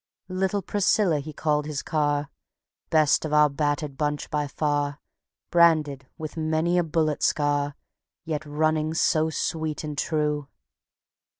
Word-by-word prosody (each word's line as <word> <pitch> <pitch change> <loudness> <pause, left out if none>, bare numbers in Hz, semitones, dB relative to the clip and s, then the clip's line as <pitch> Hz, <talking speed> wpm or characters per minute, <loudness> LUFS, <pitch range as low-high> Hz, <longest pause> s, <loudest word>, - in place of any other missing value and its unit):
"Little 190 +2 -1
Priscilla" 195 -4 +2
he 150 +2 -7
called 150 0 0
his 150 -3 -3
car, 145 -2 0 0.6
Best 155 -2 +3
of 155 -1 -3
our 150 0 +6
battered 145 -1 -1
bunch 150 0 -2
by 150 -1 0
far, 145 0 -1 0.5
Branded 155 -6 +3
with 155 0 -6
many 160 +2 +1
a - - +2
bullet 155 -2 0
scar, 145 -1 +1 0.5
Yet 155 -2 -2
running 155 +1 0
so 160 -1 +2
sweet 160 -1 -2
and 150 -1 -4
true. 150 -1 -1
150 Hz, 130 wpm, -25 LUFS, 145-160 Hz, 0.6 s, our